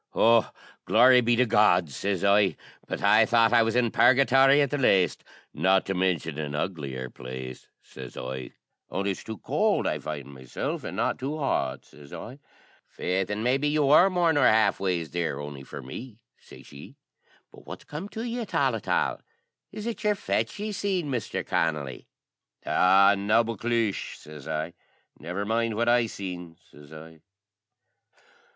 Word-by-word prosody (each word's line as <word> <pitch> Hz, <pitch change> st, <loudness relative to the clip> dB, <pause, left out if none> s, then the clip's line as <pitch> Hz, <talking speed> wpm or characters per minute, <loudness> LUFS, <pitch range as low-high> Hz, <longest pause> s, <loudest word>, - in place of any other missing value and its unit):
"O, 115 Hz, 0 st, +4 dB, 0.4 s
glory 125 Hz, +2 st, +6 dB
be 120 Hz, 0 st, +2 dB
to 125 Hz, +2 st, +3 dB
God!" 105 Hz, -, +3 dB
sez 95 Hz, +6 st, -3 dB
I, 100 Hz, -4 st, +3 dB, 0.3 s
"but -, -, -5 dB
I -, -, +6 dB
thought 115 Hz, 0 st, +3 dB
I 120 Hz, -, +6 dB
was 115 Hz, 0 st, 0 dB
in 120 Hz, -2 st, +2 dB
Purgathory 135 Hz, +2 st, +5 dB
at 140 Hz, -3 st, +1 dB
the 145 Hz, -, -1 dB
laste, 95 Hz, -8 st, +2 dB, 0.3 s
not 95 Hz, 0 st, +2 dB
to 100 Hz, -, -2 dB
mintion 85 Hz, -5 st, -1 dB
an 75 Hz, -1 st, -4 dB
uglier 70 Hz, -7 st, -4 dB
place," 65 Hz, 0 st, -8 dB, 0.2 s
sez 65 Hz, -2 st, -11 dB
I, 65 Hz, 0 st, -6 dB, 0.4 s
"only 100 Hz, +1 st, -2 dB
it's 95 Hz, -, -7 dB
too 110 Hz, -1 st, -7 dB
cowld -, -, 0 dB
I -, -, -1 dB
find 70 Hz, -2 st, -7 dB
meself, 65 Hz, -1 st, -5 dB
an' -, -, -6 dB
not -, -, -1 dB
too 140 Hz, +4 st, -4 dB
hot," 70 Hz, -, -2 dB
sez 70 Hz, -1 st, -16 dB
I. 130 Hz, +5 st, -9 dB, 0.5 s
"Faix, 95 Hz, +1 st, -2 dB
an' 105 Hz, +1 st, -3 dB
maybe 135 Hz, +4 st, +1 dB
ye 150 Hz, +1 st, 0 dB
wor 150 Hz, +6 st, +5 dB
more 175 Hz, -3 st, +2 dB
nor 145 Hz, -4 st, +4 dB
half 110 Hz, -1 st, +3 dB
ways 90 Hz, -5 st, -2 dB
there, 85 Hz, -5 st, -2 dB
on'y 75 Hz, -1 st, -7 dB
for 70 Hz, -, -9 dB
me," 105 Hz, -, -9 dB, 0.2 s
shashee; 70 Hz, -, -14 dB, 0.6 s
"but -, -, -17 dB
what's -, -, -9 dB
come 160 Hz, +7 st, -7 dB
to 225 Hz, -, -6 dB
you 240 Hz, 0 st, -3 dB
at 225 Hz, -, -7 dB
all, -, -, +2 dB
at -, -, -8 dB
all? -, -, 0 dB, 0.5 s
Is 215 Hz, 0 st, -7 dB
it 230 Hz, -2 st, -5 dB
your 210 Hz, -1 st, +2 dB
fetch 200 Hz, -, -2 dB
ye 210 Hz, +1 st, -4 dB
seen, 190 Hz, -6 st, -2 dB
Mister 120 Hz, -4 st, -3 dB
Connolly?" 75 Hz, -5 st, -2 dB, 0.6 s
"Aw, 95 Hz, +2 st, +5 dB
naboclish!" 115 Hz, +1 st, 0 dB
sez 75 Hz, -2 st, -12 dB
I. 80 Hz, +2 st, -3 dB, 0.5 s
"Never 90 Hz, +6 st, -4 dB
mind 115 Hz, +1 st, 0 dB
what 120 Hz, +2 st, 0 dB
I 120 Hz, -1 st, +3 dB
seen," 90 Hz, -5 st, -7 dB
sez 75 Hz, 0 st, -16 dB
I. 80 Hz, 0 st, -12 dB
100 Hz, 170 wpm, -26 LUFS, 80-125 Hz, 0.6 s, glory